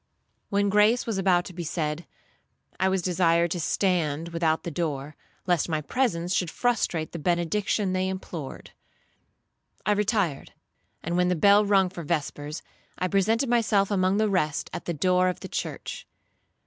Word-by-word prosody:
When 200 Hz, 0 st, +1 dB
grace 210 Hz, +4 st, +4 dB
was 220 Hz, -4 st, -2 dB
about 180 Hz, -2 st, +3 dB
to 185 Hz, -, -9 dB
be 175 Hz, 0 st, -5 dB
said, 155 Hz, -1 st, -3 dB, 0.7 s
I 190 Hz, -, +3 dB
was 190 Hz, -2 st, 0 dB
desired 170 Hz, -2 st, +2 dB
to 175 Hz, -, -1 dB
stand 165 Hz, -3 st, 0 dB
without 165 Hz, -2 st, 0 dB
the 170 Hz, -, -4 dB
door, 150 Hz, -3 st, -3 dB, 0.3 s
lest 175 Hz, -2 st, +1 dB
my 155 Hz, -2 st, 0 dB
presence 180 Hz, -, -1 dB
should 180 Hz, -, 0 dB
frustrate 175 Hz, -8 st, -1 dB
the 170 Hz, -, -6 dB
benediction 185 Hz, +4 st, 0 dB
they 185 Hz, 0 st, 0 dB
implored. 175 Hz, -6 st, -7 dB, 1.1 s
'I -, -, +2 dB
retired, 205 Hz, -, 0 dB, 0.5 s
and 170 Hz, +2 st, -1 dB
when 180 Hz, 0 st, +3 dB
the 180 Hz, -, +2 dB
bell 200 Hz, +5 st, +5 dB
rung 195 Hz, -2 st, +3 dB
for 180 Hz, -1 st, -7 dB
vespers, 150 Hz, -1 st, -3 dB, 0.3 s
I 185 Hz, -, -1 dB
presented 220 Hz, +7 st, +2 dB
myself 215 Hz, -4 st, +2 dB
among 190 Hz, 0 st, +2 dB
the 215 Hz, 0 st, +2 dB
rest 155 Hz, -7 st, -1 dB
at -, -, -6 dB
the 170 Hz, -, -2 dB
door 185 Hz, +3 st, +2 dB
of 180 Hz, -, -5 dB
the -, -, -6 dB
church. -, -, -5 dB
180 Hz, 160 wpm, -26 LUFS, 165-200 Hz, 1.1 s, bell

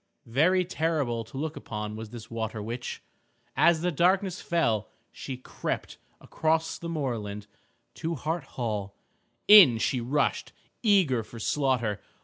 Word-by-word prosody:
Very 175 Hz, +10 st, +3 dB
terrible 155 Hz, -9 st, -1 dB
to 130 Hz, -, -10 dB
look 155 Hz, +2 st, -3 dB
upon 105 Hz, -1 st, -5 dB
was 110 Hz, 0 st, -7 dB
this 115 Hz, -1 st, -10 dB
water 110 Hz, -1 st, -3 dB
witch. 115 Hz, +4 st, -5 dB, 0.5 s
As 170 Hz, -2 st, +4 dB
the 180 Hz, +1 st, +1 dB
darkness 185 Hz, +3 st, +2 dB
fell 115 Hz, -, 0 dB, 0.2 s
she 130 Hz, -2 st, -7 dB
crept 130 Hz, -, -5 dB, 0.2 s
across 160 Hz, +1 st, -1 dB
the 170 Hz, -, -6 dB
moorland 115 Hz, -10 st, -3 dB, 0.5 s
to 165 Hz, +1 st, -3 dB
Hart 160 Hz, +2 st, -3 dB
Hall. 105 Hz, -5 st, -3 dB, 0.5 s
In 190 Hz, -, +9 dB
she 120 Hz, +3 st, 0 dB
rushed 135 Hz, +4 st, -1 dB, 0.3 s
eager 190 Hz, -, +3 dB
for 115 Hz, +2 st, -11 dB
slaughter. 120 Hz, -4 st, 0 dB
130 Hz, 130 wpm, -27 LUFS, 115-165 Hz, 0.5 s, In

